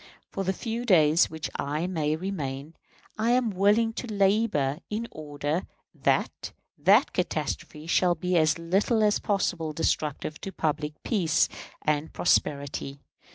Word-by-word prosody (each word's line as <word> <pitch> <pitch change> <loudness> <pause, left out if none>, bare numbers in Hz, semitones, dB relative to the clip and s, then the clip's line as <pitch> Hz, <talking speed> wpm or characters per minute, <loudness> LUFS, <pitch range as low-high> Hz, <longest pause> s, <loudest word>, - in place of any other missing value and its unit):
For 195 - -3
the 190 - +1
few 230 +4 -4
days 165 -6 +4
which 160 -1 -5
I 150 +4 -2
may 155 -4 0
remain, 155 -5 -4 0.5
I 230 +2 +3
am 245 -3 +2
willing 205 +4 +3
to 245 - -5
labor 195 -8 +2
in 220 +2 -3
order 150 +2 -3 0.3
that - - -1 0.2
that 195 - +4
catastrophe 155 -3 -3
shall 175 +1 +3
be 180 +3 -1
as 155 -1 +3
little 195 +7 +1
as 210 -1 +3
possible 175 -6 -1
destructive 155 -1 -2
to 195 - -5
public 150 -3 -2
peace 180 -8 +2 0.4
and 150 +1 0
prosperity. 140 -4 0
170 Hz, 135 wpm, -27 LUFS, 150-200 Hz, 0.5 s, days